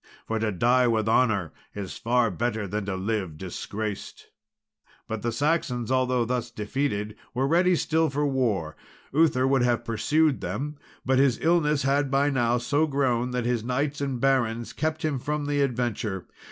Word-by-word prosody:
For 115 0 -2
to 110 -1 0
die 120 +6 +3
with 110 -2 +1
honour 110 -8 +2 0.2
is 100 -3 -5
far 120 -1 +1
better 110 +1 -2
than 105 +2 -3
to 100 -1 -2
live 95 -4 -2
disgraced." 105 +4 -6 0.8
But 110 -1 -4
the 120 - -1
Saxons, 130 -2 0
although 130 -2 +2
thus 120 0 -2
defeated, 105 -1 -2 0.2
were 130 +2 +1
ready 180 +4 +4
still 160 0 +1
for 145 +2 0
war. 110 - 0 0.4
Uther 140 -4 +3
would 135 -1 +3
have 120 -1 +1
pursued 145 +6 +1
them; 140 - -4 0.3
but 130 0 +3
his 135 -4 +3
illness 150 -4 +2
had 140 +1 +2
by 140 +2 +2
now 120 -3 +2
so 145 +6 +1
grown, 130 -4 +1
that 125 -1 -2
his 120 -2 0
knights 140 +4 -1
and 135 -3 -2
barons 120 -3 +1
kept 155 0 -2
him 145 -4 0
from 150 +3 -2
the 145 0 0
adventure. 120 -7 -1
125 Hz, 165 wpm, -26 LUFS, 110-140 Hz, 0.8 s, ready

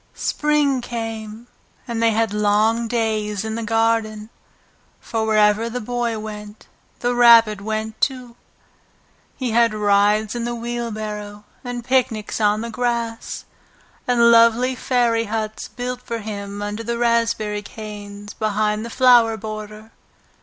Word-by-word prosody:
Spring 295 -3 +1
came, 225 -1 -6 0.4
and 230 -2 -3
they 230 - +4
had 225 -1 0
long 210 +3 +2
days 220 -3 -1
in 220 - -3
the 230 - -3
garden, 225 -1 0 0.7
for 220 -1 -3
wherever 215 +1 +3
the 250 +2 -4
Boy 240 0 -2
went 210 0 -8 0.4
the 245 0 +1
Rabbit 230 -4 +6
went 220 +1 -4
too. 250 -3 -1 1.0
He 255 -3 -2
had 230 -1 +3
rides 210 +1 +2
in 240 -1 -3
the 240 0 -2
wheelbarrow, 215 -3 -5 0.2
and 245 -2 -5
picnics 240 -5 0
on 210 0 +2
the 230 0 -5
grass, 235 -1 -3 0.6
and 235 -1 +5
lovely 230 +2 +5
fairy 240 -3 +1
huts 215 0 -4
built 250 0 -5
for 235 -2 -4
him 205 -2 -6
under 205 +2 -4
the 235 +1 -3
raspberry 230 -3 0
canes 205 -1 -9
behind 215 0 -1
the 235 - -6
flower 240 -3 +5
border. 215 0 -8
225 Hz, 130 wpm, -21 LUFS, 210-235 Hz, 1.0 s, Rabbit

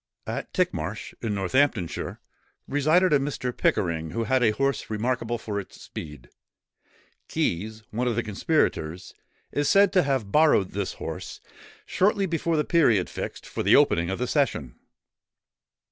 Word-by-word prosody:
At - - -5
Tickmarsh, - - -2
in 110 -3 -2
Northamptonshire, 100 - 0 0.5
resided 155 +5 +3
a 145 - +5
Mr. 135 -3 -3
Pickering, 85 -5 0
who 115 +5 -2
had 130 +4 +1
a 115 - +5
horse 135 +4 -1
remarkable 120 +2 -1
for 105 -3 -4
its 95 - -10
speed; 75 -6 -9 1.0
Keys, 110 +5 -2
one 120 +4 -1
of 120 - 0
the 120 - 0
conspirators, 95 - -1 0.4
is 145 0 0
said 200 -1 +5
to 185 - +5
have 135 - -1
borrowed 150 -11 +4
this 100 -1 -3
horse, - - -7 0.5
shortly 200 +1 +2
before 165 -2 0
the 150 - +2
period 120 - +3
fixed - - -6
for - - -4
the - - +5
opening 85 +1 +3
of 95 - -2
the 125 - -1
session. 120 - 0
120 Hz, 145 wpm, -26 LUFS, 100-145 Hz, 1.0 s, a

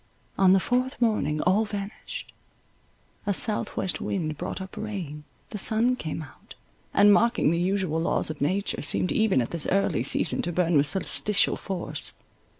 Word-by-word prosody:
On 190 -1 +5
the 195 - +5
fourth 250 +5 -1
morning 215 -10 +1
all 190 +5 +3
vanished. 205 -1 -7 0.9
A 200 - +2
south 215 +1 0
west 190 - -1
wind 155 -5 -2
brought 180 +6 -5
up 190 0 -8
rain—the 180 -3 -7
sun 230 +5 +2
came 160 -7 -5
out, 145 - -15 0.4
and 205 0 +6
mocking 235 -7 +3
the 170 - 0
usual 180 -3 0
laws 165 - 0
of 155 - -10
nature, 190 +8 -1
seemed 165 +5 +2
even 210 - +2
at - - -7
this 170 -3 +1
early 195 +1 +1
season - - +1
to 175 - -2
burn 175 -1 +1
with 145 0 +4
solsticial 200 +4 +1
force. 190 -3 -3
190 Hz, 160 wpm, -26 LUFS, 160-210 Hz, 0.9 s, and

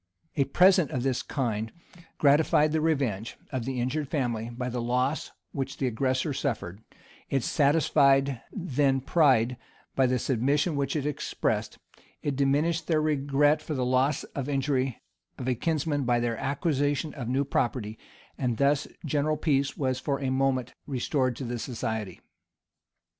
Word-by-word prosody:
] - - -45
A 140 - +2
present 180 +2 +5
of 125 - -2
this 130 -2 0
kind 110 -5 -2 0.5
gratified 150 +1 +4
the 160 0 +1
revenge 135 -10 -1
of 130 -4 -3
the 130 -1 -2
injured 135 +5 -1
family 120 -6 -1
by 125 +1 -4
the 125 -1 -2
loss 125 +5 0 0.2
which 135 -1 -4
the 135 - -1
aggressor 130 +4 0
suffered: 110 - -3 0.5
it 135 -3 0
satisfied 140 -3 +3
then 140 - +1
pride 130 -5 +3 0.4
by 135 -1 +4
the 125 0 +1
submission 140 +6 +1
which 140 +1 -1
it 145 -2 -1
expressed: 150 -1 -2 0.5
it 145 -2 -1
diminished 150 +5 +1
their 160 -2 +2
regret 145 0 +2
for 155 0 -4
the 130 -2 0
loss 130 +4 +1
or 140 0 -3
injury 135 -3 0 0.4
of 125 - -5
a 130 - +3
kinsman 150 +2 -1
by 120 -1 +2
their 120 -1 0
acquisition 145 +2 -1
of 125 -5 -5
new 135 +3 +1
property; 115 -4 -1 0.4
and 120 -3 0
thus 140 +1 +2 0.2
general 150 +1 +1
peace 140 -3 0
was 130 -2 0
for 140 -1 -1
a 135 -2 -1
moment 130 -2 0
restored 130 -1 0
to 135 - -6
the 120 -1 -3
society. 110 -6 -4
135 Hz, 155 wpm, -27 LUFS, 125-145 Hz, 0.5 s, present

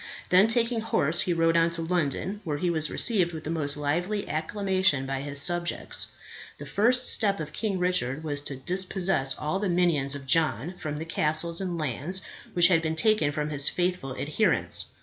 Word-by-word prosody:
Then 185 +4 +6
taking 230 0 +1
horse, 170 -7 +1
he 180 - -1
rode 165 0 +2
on 165 0 +4
to 165 - -3
London, 180 +4 -2
where 150 -5 -3
he 175 +3 0
was 155 -2 +1
received 185 -7 +2
with 160 -1 -7
the 155 - -4
most 150 -3 0
lively 175 +8 -2
acclamation 185 -2 0
by 135 0 -3
his 145 0 -1
subjects. 175 +3 0 0.5
The - - -9
first 245 +4 +2
step 200 -3 +2
of 155 - -6
King 210 -4 -2
Richard 160 -6 -1
was 145 -2 -2
to 140 - -3
dispossess 180 -2 0
all 155 +5 -2
the 205 -1 -1
minions 165 -6 +1
of 140 -1 -7
John 160 +3 +1
from 150 -2 -4
the 160 - -5
castles 165 +2 0
and 180 -3 -3
lands 155 +5 -1 0.3
which 175 0 +6
had 165 -3 +3
been 160 0 -2
taken 160 -4 +2
from 150 +1 -3
his 145 -1 +3
faithful 180 -7 -2
adherents. 155 +9 0
165 Hz, 190 wpm, -26 LUFS, 150-185 Hz, 0.5 s, Then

